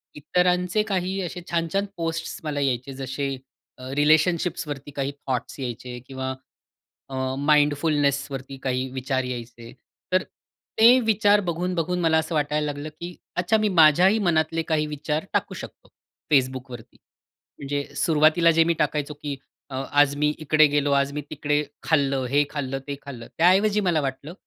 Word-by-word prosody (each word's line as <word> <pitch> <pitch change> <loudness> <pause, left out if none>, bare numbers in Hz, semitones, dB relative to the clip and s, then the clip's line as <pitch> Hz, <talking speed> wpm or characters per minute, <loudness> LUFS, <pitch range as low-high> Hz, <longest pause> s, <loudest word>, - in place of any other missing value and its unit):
इतरांचे 180 +5 +1
काही 190 -2 -2
असे 180 0 -5
छान-छान 170 +4 0
पोस्ट्स 165 0 -3
मला 150 -2 -2
यायचे, 135 -1 -1
जसे 135 +1 -3 0.5
अ, 130 - -7
रिलेशनशिप्सवरती 155 -1 +1
काही 140 0 -2 0.2
थॉट्स 130 +2 -3
यायचे 125 0 -6
किंवा 130 -1 -4 0.8
अ, 135 - -6 0.2
माइंडफुलनेसवरती 145 -2 +1
काही 130 0 -1
विचार 130 0 -2
यायचे, 120 -2 -7 0.4
तर 185 0 +3 0.6
ते 240 +3 +8
विचार 210 -1 +4
बघून-बघून 180 +1 -1
मला 160 -1 +3
असं 160 +1 -1
वाटायला 150 0 0
लागलं, 145 +1 -4
की 170 +3 -9 0.2
अच्छा, 180 +5 +2
मी 215 -1 +1
माझ्याही 180 +4 +5
मनातले 165 -4 +1
काही 155 -1 +2
विचार 150 +2 -3
टाकू - - 0
शकतो - - -10 0.4
Facebookवरती. 130 -3 -1 0.6
म्हणजे 140 0 -2
सुरुवातीला 160 +1 +4
जे 165 0 +4
मी 170 +1 +1
टाकायचो, 150 0 -1
की 145 -1 -5 0.3
अ, 135 - -6 0.2
आज 145 -1 +4
मी 150 0 +2
इकडे 155 0 +4
गेलो, 145 0 +2
आज 140 0 +2
मी 150 - -3
तिकडे 150 0 0 0.2
खाल्लं, 140 -4 +1
हे 145 +2 +3
खाल्लं, 135 -2 -3
ते 140 - -3
खाल्लं. 125 -5 -9
त्याऐवजी 195 +5 +4
मला 160 -3 +2
वाटलं, 140 +3 -5
150 Hz, 145 wpm, -24 LUFS, 135-170 Hz, 0.8 s, ते